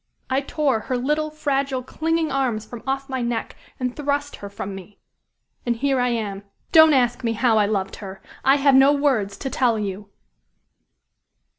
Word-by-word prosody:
I 265 +1 +2
tore 280 -4 0
her 250 +3 -3
little, 300 +5 0
fragile, 275 -3 -1
clinging 320 +4 -1
arms 250 -5 -1
from 230 +1 -9
off 270 0 -2
my 260 -1 -3
neck, 235 -1 -3 0.2
and 250 -1 -2
thrust 290 0 -2
her 200 - -8
from 200 0 -6
me. 195 +1 -11 0.7
And 240 -1 0
here 270 +2 0
I 250 - +2
am. 210 -4 -3 0.3
Don't 315 -2 +8
ask 245 0 +1
me 230 -1 0
how 225 -1 +3
I 205 - +3
loved 195 -2 -2
her! 195 -2 -8 0.2
I 270 +1 +5
have 280 -1 +4
no 270 +2 +7
words 260 -9 0
to 270 - -5
tell 240 -3 +2
you!" 200 -1 -5
255 Hz, 175 wpm, -22 LUFS, 215-280 Hz, 0.7 s, Don't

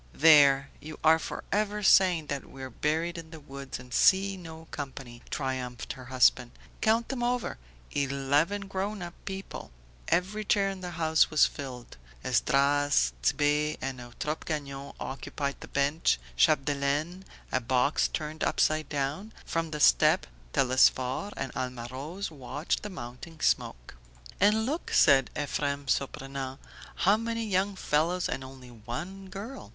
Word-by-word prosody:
"There! 140 -3 +6
You 155 +1 -9
are 160 +1 +6
forever 210 +4 -2
saying 185 -4 +5
that 140 -2 -5
we 135 - -10
are 130 - -6
buried 165 +6 -1
in 160 -1 -10
the 160 -1 -10
woods 140 -2 -8
and 125 0 -12
see 195 +6 +4
no 165 -3 -10
company," 130 -4 -7
triumphed 130 -3 -3
her 130 - -11
husband. 125 -1 +3 0.3
"Count 225 +1 +2
them 265 -3 -3
over: 245 - -1 0.3
eleven 140 +7 +1
grown 195 0 -4
up 175 0 -7
people!" 195 0 -6 0.4
Every 195 +4 0
chair 200 -1 +2
in 190 -1 -8
the 180 - -5
house 160 -1 +3
was 155 - +5
filled; 125 - -7 0.3
Esdras, 140 - +2
Tit'Bé 150 - +1
and 135 -2 -4
Eutrope 125 +6 -5
Gagnon 140 -3 -5
occupied 140 +1 -4
the - - -10
bench, 140 - +1 0.2
Chapdelaine, 145 - +1 0.3
a 130 - +2
box 130 +4 +2
turned 155 0 -4
upside 155 0 +1
down; 145 +9 -3
from 165 -1 -2
the 150 -1 -5
step 60 - +5 0.3
Telesphore 130 - +2
and 130 - -3
Alma 125 -2 -4
Rose 160 +9 -5
watched 145 +2 -3
the 210 - -6
mounting 160 0 -9
smoke. - - 0 0.5
"And 215 +3 +4
look," 300 +7 -3
said 135 -2 +5
Ephrem 145 -1 -2
Surprenant, 135 0 -2 0.5
"how 200 +3 +6
many 230 0 -2
young 195 0 0
fellows 170 +2 +1
and 130 - -4
only 130 -1 -12
one 155 - -7
girl!" 210 +8 -8
150 Hz, 145 wpm, -29 LUFS, 135-185 Hz, 0.5 s, There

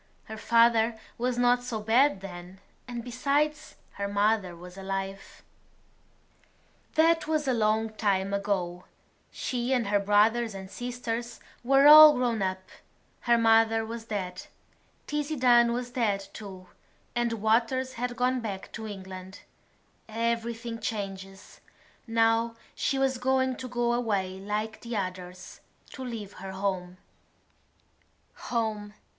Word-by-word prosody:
Her 220 - -9
father 230 0 +3 0.2
was 245 0 -1
not 245 0 +3
so 240 -3 -4
bad 225 +1 +3
then; 180 0 -9 0.3
and 240 -1 -5
besides, 280 +5 -1 0.2
her 200 - -1
mother 205 -2 +1
was 180 +1 -12
alive. 195 0 -6 1.5
That 325 0 +3
was 310 -2 0
a 260 - +2
long 220 -1 +1
time 200 -2 0
ago; 185 -3 -2 0.4
she 245 0 -3
and 235 -5 0
her 205 0 +3
brothers 215 +2 +2
and 190 0 -9
sisters 240 -1 -5 0.2
were 270 +3 +4
all 305 0 +11
grown 240 -4 0
up; 185 0 -2 0.5
her 240 -1 +3
mother 225 0 +4
was 225 0 -7
dead. 185 -5 -5 0.6
Tizzie 295 +1 -2
Dunn 240 -3 +5
was 245 +1 -3
dead, 205 -6 -1
too, 190 -3 -9 0.5
and 240 0 +1
the 230 - -3
Waters 230 +5 +1
had 245 +1 -3
gone 250 +2 +1
back 200 -4 -6
to 220 -1 -7
England. 190 -1 -9 0.7
Everything 230 +1 -2
changes. 195 -3 -6 0.5
Now 225 0 +2 0.2
she 275 - -1
was 265 -1 +1
going 260 0 +1
to 260 - -6
go 240 -1 0
away 200 -6 -1
like 210 +2 -4
the 235 -2 -4
others, 185 -1 -6 0.3
to 260 - -8
leave 220 -5 -6
her 190 0 -6
home. 185 -2 -3 1.5
Home! 215 -3 -2
225 Hz, 130 wpm, -28 LUFS, 195-245 Hz, 1.5 s, all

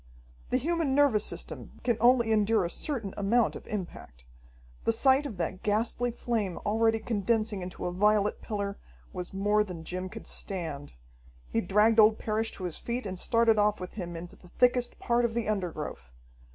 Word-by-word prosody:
The 255 - +2
human 315 0 0
nervous 280 -7 +4
system - - -6
can 240 -2 +2
only 240 -1 +4
endure 215 -2 +3
a 170 - -3
certain 225 - -3
amount 220 +3 +2
of - - -10
impact. 170 - -7 0.6
The - - +3
sight 265 +5 +3
of 215 - -8
that 175 +2 -3
ghastly 225 +3 +1
flame, 225 -6 -2
already 225 +2 +2
condensing 220 -1 -1
into 180 0 -6
a 175 - -1
violet 210 +2 +2
pillar, 200 -2 -4 0.3
was 180 - -5
more 205 +2 +2
than 180 -5 -8
Jim 185 +3 -4
could 225 +3 -9
stand. 160 -7 -4 0.6
He - - +1
dragged 210 +5 +3
old 215 0 +7
Parrish 220 +1 -1
to 190 - -8
his 175 -3 -4
feet 240 +1 -3
and 185 -2 -4
started 230 -2 +3
off 210 0 +2
with 180 -1 -7
him 175 -4 -6
into 175 +1 -8
the 180 - -18
thickest 245 +3 +2
part 240 0 +1
of 235 -1 0
the 235 -2 -1
undergrowth. 165 - -3
210 Hz, 180 wpm, -29 LUFS, 185-230 Hz, 0.6 s, old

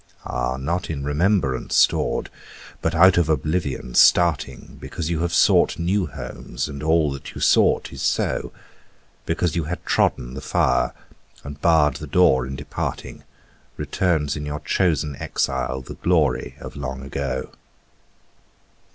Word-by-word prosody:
Ah, - - -2
not 85 +7 -2
in 70 -4 -4
remembrance 75 -2 0
stored, - - +2 0.5
but 80 0 -1
out 90 +1 +6
of 80 -2 +1
oblivion 75 -4 -1
starting, 85 +1 +3
Because 75 +5 -4
you 80 - -1
have 85 0 -1
sought 85 - +4
new 90 +2 0
homes 65 -1 -6
and 70 -2 -7
all 80 -1 +2
that 70 - -8
you - - -6
sought - - +3
is - - -7
so, - - -1 0.8
Because 85 -3 0
you 85 -3 -1
had 90 +3 -5
trodden 65 -1 +1
the 65 - -6
fire - - +1 0.5
and 70 0 -9
barred 75 -5 +3
the 75 - -8
door 70 -6 +3
in 65 - -5
departing, - - -5 0.6
Returns 80 -6 0
in 75 - -5
your 75 0 -4
chosen 80 -6 0
exile 65 +2 -2
the 65 - -9
glory 80 -7 0
of - - -9
long 65 -2 -5
ago. 70 -1 -4
75 Hz, 145 wpm, -22 LUFS, 65-85 Hz, 0.8 s, out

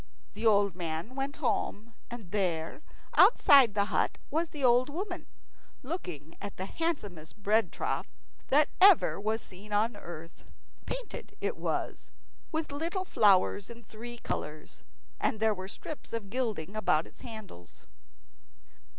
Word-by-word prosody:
The 225 - 0
old 200 -3 +4
man 170 +5 -4
went 275 +1 -3
home, 235 -5 -1 0.2
and 225 -7 -8
there, 175 - -1 0.3
outside 275 - +7
the 200 -1 +3
hut, - - +1
was 325 +1 0
the 295 -3 -4
old 250 +2 +5
woman, 360 +8 -5 0.6
looking 175 - -6
at 200 - -6
the 185 - -3
handsomest 205 - -4
bread 215 +3 +3
trough - - -2 0.4
that 290 +2 +4
ever 385 - +7
was 220 +2 -1
seen 200 +3 -12
on 215 +2 +2
earth. 170 -4 -10 0.4
Painted - - -6
it - - -1
was, - - -3 0.4
with 315 -2 -2
little 335 +6 -2
flowers, 200 - +3
in 235 0 -11
three 235 +3 -8
colours, 155 -8 -5 0.4
and 220 - 0
there 220 0 +3
were 190 -1 -6
strips 295 +8 -8
of 210 -4 -4
gilding 215 -7 -2
about 165 -7 +2
its - - -17
handles. 215 - -10
220 Hz, 140 wpm, -30 LUFS, 190-270 Hz, 0.6 s, outside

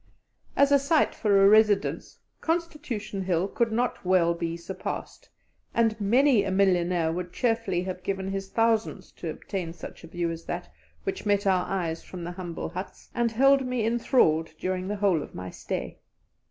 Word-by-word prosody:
As 280 0 +4
a 280 - +6
site 305 +3 +2
for 200 -2 +3
a - - +8
residence 210 -1 +3 0.2
Constitution 300 - -3
Hill 185 -1 +1
could 230 +2 0
not 240 +2 -1
well 180 -2 +3
be 170 0 -3
surpassed, 180 +3 -6 0.5
and 225 -2 +2
many 240 +2 +4
a 195 - -2
millionaire 180 -3 +2
would 180 0 -4
cheerfully 225 -7 0
have 185 -1 -5
given 195 0 -3
his 195 0 -4
thousands 225 0 0
to - - -6
obtain 180 -5 -5
such 175 - -10
a - - -9
view 170 0 -2
as 165 0 -7
that - - -5 0.3
which 390 - -4
met 205 0 +2
our 185 -2 +2
eyes 170 -4 -2
from 180 -2 -9
the 175 - -4
humble 175 -3 -5
huts, 185 +3 -8
and 235 -1 +1
held 275 +3 +5
me 250 -3 -1
enthralled 225 - +2
during 185 +2 -2
the 205 - -2
whole 195 -6 +2
of - - -9
my 90 0 -6
stay. - - -5
195 Hz, 175 wpm, -27 LUFS, 175-230 Hz, 0.5 s, a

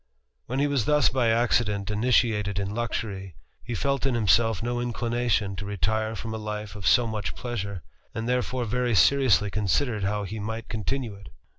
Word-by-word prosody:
When 130 - -3
he 140 - +3
was 140 -6 +1
thus 150 +2 +4
by 125 -2 +1
accident 115 -3 +1
initiated 105 -3 +2
in 100 0 -2
luxury, 100 -5 -3 0.3
he 120 - -4
fe 140 +4 +1
in 135 -2 +1
himself 115 -1 +3
no 120 +1 -1
inclination 120 -4 0
to 100 - -5
retire 110 +2 -1
from 110 +1 -5
a - - -3
life 105 0 -5
of 100 - -3
so 120 -2 +5
mu( 110 -2 -3
pleasure, 100 0 -4 0.3
and 115 +1 -4
therefore 125 0 0
very 120 +1 0
seriously 110 -5 +4
considered 105 +3 0
how 105 +1 -1
might 110 +3 -5
continue 110 +2 -3
it. 100 0 -13
110 Hz, 170 wpm, -26 LUFS, 105-120 Hz, 0.3 s, so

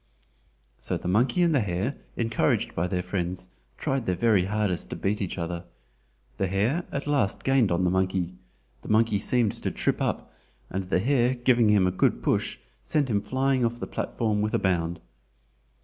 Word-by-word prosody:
So - - -2
the - - -6
monkey 120 - +3
and 170 -2 +3
the 140 - +4
hare, 100 +5 -1 0.2
encouraged 115 -1 +1
by 85 +2 0
their 90 -1 -2
friends, 90 0 -3 0.3
tried 135 -4 -1
their 90 - +1
very 100 -1 +3
hardest 100 - -1
to - - -4
beat 105 +2 -1
each 95 - -3
other. 85 0 -3 0.7
The 95 - 0
hare 110 - 0
at 140 - -3
last 140 -9 0
gained 135 -7 +3
on 85 +1 +1
the 90 - +2
monkey. 95 -1 0 0.5
The - - -10
monkey 110 -1 +3
seemed 115 0 +2
to - - -3
trip - - 0
up, - - -2 0.4
and 95 -1 -3
the - - +3
hare 125 +2 +2
giving 120 -2 +3
him 105 -3 +4
a 90 - +2
good 90 - +1
push - - 0 0.3
sent 145 -5 0
him 100 -1 +2
flying 130 +2 +1
off 115 0 +1
the 120 - -4
platform 110 -3 -1
with 110 +1 0
a - - +2
bound. 85 -2 0
105 Hz, 185 wpm, -26 LUFS, 90-120 Hz, 0.7 s, the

